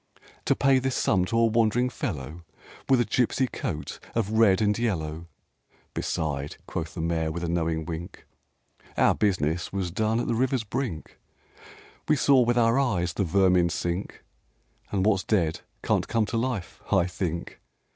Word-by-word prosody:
To - - +3
pay 135 -1 +4
this 130 0 -1
sum 90 -2 +2
to 115 +5 -1
a 115 - +5
wandering 115 +2 +2
fellow 75 - -5 0.5
With 130 -2 +5
a 120 - +2
gypsy 125 +2 +1
coat - - -4 0.2
of 110 -3 0
red 110 -3 +4
and 105 -1 +2
yellow! 85 -7 -2 0.7
"Beside," 70 -2 -3
quoth 80 -1 -5
the 85 - -3
Mayor, 80 -1 0
with 85 +2 -5
a - - -1
knowing 80 -1 -1
wink, 85 +3 -7 0.7
"Our - - +5
business 90 -4 0
was 95 -3 -2
done 110 +4 0
at 120 - -1
the - - 0
river's 130 +1 +1
brink; 110 -7 -4 0.9
We 155 - +4
saw 140 -2 +4
with 120 0 +2
our 115 +2 +4
eyes 90 -11 0
the 100 - 0
vermin 90 -1 +3
sink, 85 +3 -3 0.7
And 95 -1 0
what's 100 -3 +2
dead 85 -7 +1 0.2
can't - - +1
come 115 -2 +1
to 105 - -5
life, 115 -6 -3
I 95 -4 +4
think. 85 -2 -4
100 Hz, 165 wpm, -26 LUFS, 85-115 Hz, 0.9 s, a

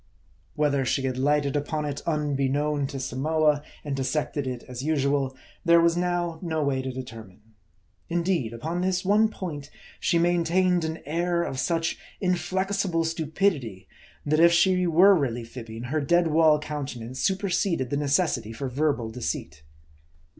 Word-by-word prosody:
Whether 145 -2 +1
she 130 +1 0
had 130 -1 -2
lighted 145 0 +1
upon 150 +1 -1
it 145 -1 -4
unbeknown 145 -1 0
to 135 -1 -6
Samoa, 150 +3 +1 0.2
and 145 -2 -2
dissected 135 +1 -2
it 125 -2 -4
as 125 0 -7
usual, 140 -3 0 0.3
there 170 -1 +6
was 170 0 +3
now 175 -2 -1
no 160 -4 -1
way 135 -2 0
to 130 0 -4
determine. 115 -6 -9 0.7
Indeed, 170 -8 0
upon 160 +10 -3
this 185 0 0
one 210 +3 +4
point, 150 -9 -6 0.3
she 170 - +2
maintained 175 +1 +2
an 160 0 -5
air 170 +3 0
of 130 - -4
such 165 +4 -1 0.2
inflexible 185 -1 0
stupidity, 160 - -1 0.4
that 155 +1 +2
if 170 +1 +7
she 180 +1 +3
were 180 +5 +6
really 120 -7 -1
fibbing, 115 -1 -8
her 145 +5 -1
dead 170 +3 +3
wall 155 -1 +5
countenance 135 -5 -6
superseded 185 - 0
the - - +1
necessity 140 - 0
for 130 +4 -4
verbal 130 -4 0
deceit. 85 -9 -4
150 Hz, 145 wpm, -26 LUFS, 130-170 Hz, 0.7 s, if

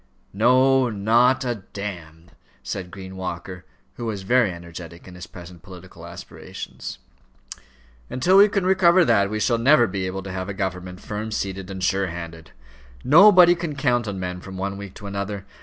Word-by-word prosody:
"No, 130 +4 +3
not 120 +5 +2
a 120 -4 -3
d 100 -3 -5 0.3
," 65 0 -33
said 90 +6 -5
Green 95 +1 -10
Walker, 90 0 -6 0.3
who 120 - -5
was 100 -3 -4
very 120 0 +2
energetic 85 0 -10
in 90 - -11
his 90 0 -10
present 90 -1 -12
political 90 0 -12
aspirations. - - -9 1.1
"And - - -5
till 185 +8 +4
we 205 +1 +7
can 195 -2 -1
recover 185 -2 +4
that, 100 -6 +3
we 110 +1 -3
shall 115 +2 +1
never 130 +1 +5
be 95 -2 -3
able 95 +1 -5
to 95 - -7
have 95 +1 -5
a 100 - -5
government 90 -1 -5
firm 105 +1 -5
seated 95 -2 -4
and 95 -1 -6
sure 95 0 +1
handed. 85 -2 -8 0.5
Nobody 180 +3 +7
can 170 -4 -5
count 125 -4 0
on 100 -2 -4
men 90 -1 -5
from 95 0 -9
one 100 +1 -3
week 100 -1 -9
to 105 - -11
another. 100 0 -5
100 Hz, 180 wpm, -23 LUFS, 90-125 Hz, 1.1 s, we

